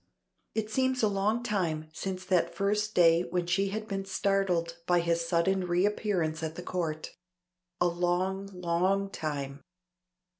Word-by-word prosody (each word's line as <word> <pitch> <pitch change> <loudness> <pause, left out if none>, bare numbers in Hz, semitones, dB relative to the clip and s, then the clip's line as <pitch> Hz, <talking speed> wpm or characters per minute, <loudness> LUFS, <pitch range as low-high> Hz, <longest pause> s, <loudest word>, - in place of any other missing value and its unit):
It 220 -1 -2
seems 260 +1 +1
a - - +6
long 205 +4 0
time 170 -9 -1
since 185 +2 -4
that 180 -3 +1
first 210 +2 0
day 165 -1 +6
when 180 0 -1
she 195 +3 +1
had 215 +2 -4
been 195 -2 -2
startled 190 -4 0
by 175 -1 +4
his 170 0 0
sudden 180 +3 +2
reappearance 175 -3 +1
at 160 0 -3
the 180 - -6
Court. 160 -4 -3 0.7
A 175 - +3
long, 180 +3 0
long 185 +2 0
time. 140 -4 -4
180 Hz, 145 wpm, -30 LUFS, 170-195 Hz, 0.7 s, a